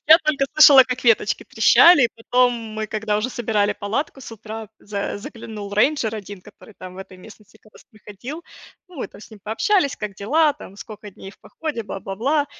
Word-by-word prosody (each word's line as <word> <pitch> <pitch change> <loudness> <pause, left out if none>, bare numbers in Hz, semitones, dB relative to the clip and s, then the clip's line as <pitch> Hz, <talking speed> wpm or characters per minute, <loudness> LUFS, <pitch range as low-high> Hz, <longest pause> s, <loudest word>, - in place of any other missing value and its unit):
Я 320 +2 +8
только 305 -4 0
слышала, 280 -3 +8
как 250 0 -5
веточки 230 -2 +2
трещали. 340 -6 +6
И - - +2
потом 245 +2 +2
мы, 220 -2 -6
когда 215 0 -2
уже 215 +4 -2
собирали 210 -4 -1
палатку, 265 +8 -4
с 235 - -10
утра 220 0 -9
за 200 -1 -5
заглянул 210 -1 -9
рейнджер 225 0 +1
один, 205 -2 -9
который 210 +3 -17
там 185 0 -10
в - - -12
этой 190 -1 -11
местности 215 +2 -17
как 215 - -23
раз - - -18
проходил. 215 - -10 0.5
Ну, 360 - -16
мы 265 - -5
там - - -16
с - - -14
ним 215 - -13
пообщались: 280 - 0
как 210 -2 -6
дела, 295 +11 +2
там 195 - -13
сколько 210 0 -11
дней 195 0 -12
в - - -22
походе, 300 -7 -6
бла-бла-бла. 225 +9 -2
220 Hz, 195 wpm, -21 LUFS, 205-270 Hz, 0.5 s, Я